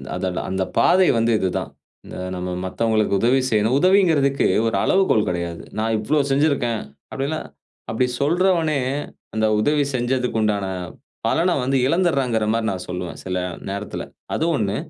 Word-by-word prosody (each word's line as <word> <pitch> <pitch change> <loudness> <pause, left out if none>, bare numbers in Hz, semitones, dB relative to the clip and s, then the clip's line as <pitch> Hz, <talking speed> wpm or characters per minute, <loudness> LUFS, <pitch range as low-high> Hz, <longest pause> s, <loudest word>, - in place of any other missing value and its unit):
அத - - -3 0.2
அந்த 95 0 0
பாதை 185 0 +5
வந்து 115 +1 +2
இது 95 - 0
தான். - - -5 0.4
இத - - -7
நம்ம 90 0 -4 0.2
மத்தவங்களுக்கு 110 +1 +1
உதவி 125 +3 +4
செய்யணும். 110 +2 +2
உதவிங்கிறதுக்கு 160 -7 +3 0.2
ஒரு 115 - 0
அளவுகோல் 185 - +3
கிடையாது. 85 -1 -4
நான் 110 +1 0
இவ்வளோ 145 +8 +1
செஞ்சுருக்கேன். 135 -5 +1 0.3
அப்டில்லாம் 140 +4 -3 0.4
அப்டி 115 +3 +1 0.2
சொல்றவனே, 165 -1 +2 0.5
அந்த 110 0 +1
உதவி 145 +6 +2
செஞ்சதுக்கு 125 -1 0
உண்டான 105 -2 0 0.6
பலனை 175 +1 +2
வந்து 135 +2 +1
இழந்துருறாங்கிற 135 -10 +1
மாரி 115 -1 0
நான் 90 -1 -5
சொல்லுவேன், 90 -1 -5
சில 90 0 -2 0.3
நேரத்தில. 100 +1 -4 0.3
அது 160 - 0
1. 105 -5 -1
120 Hz, 140 wpm, -22 LUFS, 105-150 Hz, 0.6 s, பாதை